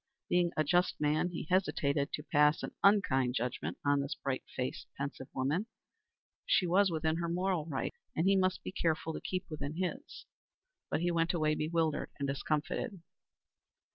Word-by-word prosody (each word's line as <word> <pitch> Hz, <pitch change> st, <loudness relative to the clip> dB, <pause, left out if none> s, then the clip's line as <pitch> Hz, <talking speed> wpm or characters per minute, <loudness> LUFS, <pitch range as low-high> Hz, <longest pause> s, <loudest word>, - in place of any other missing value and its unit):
Being 175 Hz, -1 st, +3 dB
a 155 Hz, -, +4 dB
just 175 Hz, +4 st, +2 dB
man, 150 Hz, +4 st, +2 dB
he 175 Hz, -, -4 dB
hesitated 145 Hz, -6 st, +1 dB
to 150 Hz, -, -3 dB
pass 150 Hz, 0 st, +3 dB
an -, -, -4 dB
unkind 135 Hz, -12 st, +4 dB
judgment 125 Hz, +2 st, -2 dB
on 145 Hz, 0 st, +3 dB
this 140 Hz, +3 st, -3 dB
bright 135 Hz, -1 st, -3 dB
faced, 125 Hz, 0 st, -3 dB
pensive 140 Hz, -1 st, -4 dB
woman. 150 Hz, +11 st, 0 dB, 0.8 s
She 185 Hz, -, +4 dB
was 190 Hz, +3 st, +4 dB
within 160 Hz, -1 st, 0 dB
her 170 Hz, 0 st, -2 dB
moral 180 Hz, -2 st, 0 dB
rights, 140 Hz, -5 st, -3 dB, 0.2 s
and 165 Hz, -, +1 dB
he 195 Hz, -, +5 dB
must 185 Hz, -1 st, +1 dB
be -, -, -4 dB
careful 160 Hz, -3 st, 0 dB
to -, -, -5 dB
keep 185 Hz, 0 st, -3 dB
within 155 Hz, -1 st, -5 dB
his. 185 Hz, -, -4 dB, 0.6 s
But -, -, 0 dB
he 175 Hz, 0 st, +1 dB
went 165 Hz, +1 st, +1 dB
away 155 Hz, -2 st, +2 dB
bewildered 155 Hz, 0 st, 0 dB
and 140 Hz, -, -2 dB
discomfited. 155 Hz, -, -2 dB
160 Hz, 170 wpm, -33 LUFS, 145-180 Hz, 0.8 s, he